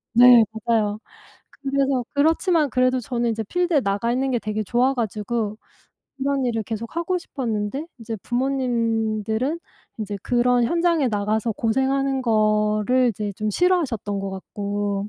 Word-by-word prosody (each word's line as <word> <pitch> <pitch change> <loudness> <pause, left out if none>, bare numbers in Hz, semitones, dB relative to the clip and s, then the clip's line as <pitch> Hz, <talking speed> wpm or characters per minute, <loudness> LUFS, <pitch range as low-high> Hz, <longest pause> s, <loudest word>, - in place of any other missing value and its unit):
네. 245 -1 +8 0.2
맞아요. 215 -3 +1 0.6
그래서 275 -2 0
그렇지만 320 +1 +2
그래도 255 0 +2
저는 240 0 -2
이제 220 0 -3
필드에 345 - +1
나가 205 +2 0
있는 265 +2 0
게 245 - +1
되게 215 0 -3
좋아 245 +6 +2
가지고 215 -1 -2 0.6
그런 275 0 0
일을 225 -2 -1
계속 225 +3 -6
하고 355 +2 0
싶었는데 245 -2 -3
이제 225 -1 -5
부모님들은 235 0 -1 0.4
인제 210 -2 -4
그런 245 0 +2
현장에 335 0 +2
나가서 215 +1 0
고생하는 265 +4 0
거를 215 +2 +2
이제 210 -2 -3
좀 215 +2 -2
싫어하셨던 245 - 0
것 195 0 -4
같고 200 +1 -3
235 Hz, 315 characters per minute, -23 LUFS, 215-270 Hz, 0.6 s, 네